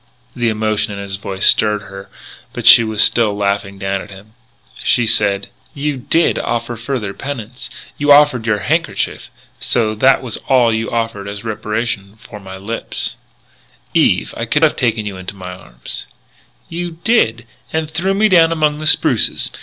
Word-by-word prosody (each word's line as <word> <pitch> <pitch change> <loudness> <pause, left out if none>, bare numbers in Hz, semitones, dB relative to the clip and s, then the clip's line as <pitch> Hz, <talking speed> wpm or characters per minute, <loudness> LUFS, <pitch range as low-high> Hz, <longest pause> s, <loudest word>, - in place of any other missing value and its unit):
The 120 -2 +1
emotion 110 -1 -1
in - - -7
his 100 -1 -5
voice 95 -1 -3
stirred 105 -1 +4
her 95 0 -10 0.4
but 120 -3 -6
she 115 - +9
was 110 -1 +2
still 110 -4 +2
laughing 100 -1 -1
down 95 0 -2
at - - -11
him. 100 +2 -14 0.5
She 120 - +3
said: 100 -3 +1 0.3
"You 145 0 -2
did 165 +6 +1
offer 120 0 -2
further 115 -3 -4
penance 125 -2 -7 0.3
you 145 0 +3
offered 145 -5 +5
your 105 -2 +1
handkerchief. - - -1 0.3
So 110 -2 0
as 110 - -8
that 135 +2 +4
was 120 -4 -2
all 125 -4 +4
you 110 +1 -2
offered 115 -4 -3
as 100 +1 -6
reparation 110 -2 -3
for 105 -1 -12
my 95 -1 -9
lips 105 +4 -4 0.4
" - - -33 0.3
"Eve! - - +2
I - - -2
could - - +1
have - - +4
taken 110 -3 0
you 100 -2 -5
into 95 +2 -7
my 90 -1 -8
arms 60 -9 -9 0.3
" - - -30 0.3
"You 170 0 -5
did! 120 - +2 0.3
And 160 0 -1
threw 190 +4 0
me 215 +2 +4
down 165 -4 +5
among 150 -2 +1
the 155 - -2
spruces. - - +2
110 Hz, 175 wpm, -17 LUFS, 100-130 Hz, 0.5 s, she